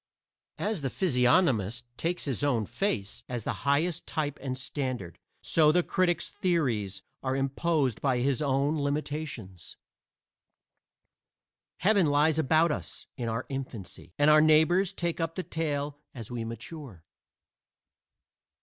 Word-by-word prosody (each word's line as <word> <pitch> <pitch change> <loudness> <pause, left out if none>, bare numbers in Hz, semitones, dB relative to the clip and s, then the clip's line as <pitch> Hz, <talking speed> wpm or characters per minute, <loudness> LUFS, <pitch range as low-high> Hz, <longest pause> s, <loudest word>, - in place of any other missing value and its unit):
As 210 -6 -2
the 135 - -1
physiognomist 125 - +2
takes 175 +6 -2
his 135 -2 -2
own 125 -7 +2
face 105 - -2
as 120 -3 -3
the - - -1 0.2
highest 155 +4 +1
type 145 -2 -2
and 130 -2 -3
standard, 130 - -4 0.2
so 155 -2 +5
the 175 +2 +3
critic's 175 -2 +1
theories 115 - -1 0.2
are 130 0 -1
imposed 135 -1 0
by 135 -3 +2
his 135 +3 +1
own 140 +2 +1
limitations. 145 - -4 2.0
"Heaven 195 -2 +3
lies 150 +2 +3
about 160 +2 +3
us - - -6
in 120 -4 -3
our 115 +2 -2
infancy," 115 -10 -7
and 145 +1 +5
our 155 0 +7
neighbors 160 +5 +4
take 170 -3 -2
up 165 0 -2
the 185 - -3
tale 145 -3 -2 0.2
as 115 -2 -7
we 120 -2 -3
mature. 115 - -8
145 Hz, 130 wpm, -29 LUFS, 125-160 Hz, 2.0 s, our